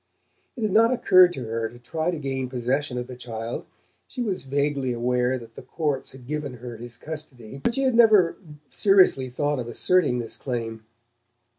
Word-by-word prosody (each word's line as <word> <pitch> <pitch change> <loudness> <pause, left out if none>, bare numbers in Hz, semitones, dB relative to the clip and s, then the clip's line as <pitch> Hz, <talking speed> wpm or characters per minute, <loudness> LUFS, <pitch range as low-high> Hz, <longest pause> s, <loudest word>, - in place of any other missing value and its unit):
It 235 - -5
had 215 - +1
not 225 +4 +5
occurred 185 -7 +6
to 130 - -5
her 115 0 -2
to 120 - -14
try 155 +7 -3
to 175 - -2
gain 135 -3 -3
possession 125 +2 -1
of 125 - -3
the 125 - -9
child. 115 -1 -6 0.4
She 250 - -4
was 195 -9 -3
vaguely 140 -1 0
aware 125 +1 +1
that 115 -2 -12
the - - -10
courts 150 -5 -2
had 130 -2 -13
given 145 -1 -4
her 120 0 -8
his 120 0 -8
custody; 140 -5 -8
but 235 - +1
she 270 - 0
had 260 -2 +2
never 215 -7 +6 0.3
seriously 185 -10 +4
thought 145 +2 -1
of 120 - -4
asserting 145 +2 +2
this 115 -2 -5
claim. 115 -4 -4
135 Hz, 185 wpm, -25 LUFS, 120-165 Hz, 0.4 s, occurred